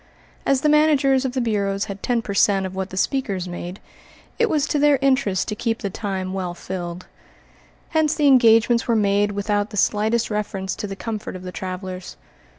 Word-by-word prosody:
As 275 -1 +3
the - - +2
managers 290 -3 +4
of 255 - -2
the 260 - 0
bureaus 200 -3 0
had 200 -1 -7
ten 240 -2 0
per 200 - -4
cent. 195 -1 +3
of 190 - -5
what 190 0 -4
the 185 - -8
speakers 195 -6 -1
made, 175 +1 -6 0.6
it 465 -1 +3
was 300 -4 +1
to 295 - 0
their 290 -1 +5
interest 260 -8 +1
to 210 - -2
keep 225 +1 -2
the 200 - -2
time 190 -2 -4
well 180 -2 -3
filled. 175 -1 -6 0.8
Hence 315 -2 +1
the 300 - +1
engagements 235 -3 +5
were 235 - +2
made 205 -1 +2
without 205 +1 -1
the 210 - -7
slightest 220 +3 +1
reference 200 -2 -3
to 210 - -4
the 195 - -6
comfort 215 -1 -5
of 185 - -8
the 180 - -6
travelers. 185 0 -6
210 Hz, 195 wpm, -22 LUFS, 190-255 Hz, 0.8 s, their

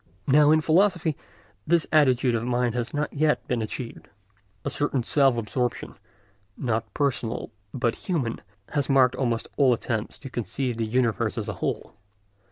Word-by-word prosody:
Now 145 +2 +5
in 155 +1 +5
philosophy 170 -1 +2 0.5
this 170 -1 +3
attitude 130 -5 +4
of 115 -1 -1
mind 120 -1 0
has 120 0 -3
not 145 0 -2
as 145 - -8
yet 155 -1 +2
been 125 -2 -1
achieved. 115 +2 -6 0.6
A - - 0
certain 140 -4 +1
self 135 -1 +3
absorption, 120 +2 -2 0.6
not 115 -3 -2
personal, 125 -6 -1 0.2
but 120 -2 0 0.2
human, 135 -10 -1 0.3
has 145 -2 -1
marked 130 -2 +5
almost 120 -4 -1
all 135 -4 +5
attempts 115 -2 -3
to 135 - -9
conceive 120 +2 -3
the 115 -1 -1
universe 120 -1 0
as - - -3
a - - -3
whole. - - -3
125 Hz, 160 wpm, -25 LUFS, 115-145 Hz, 0.6 s, Now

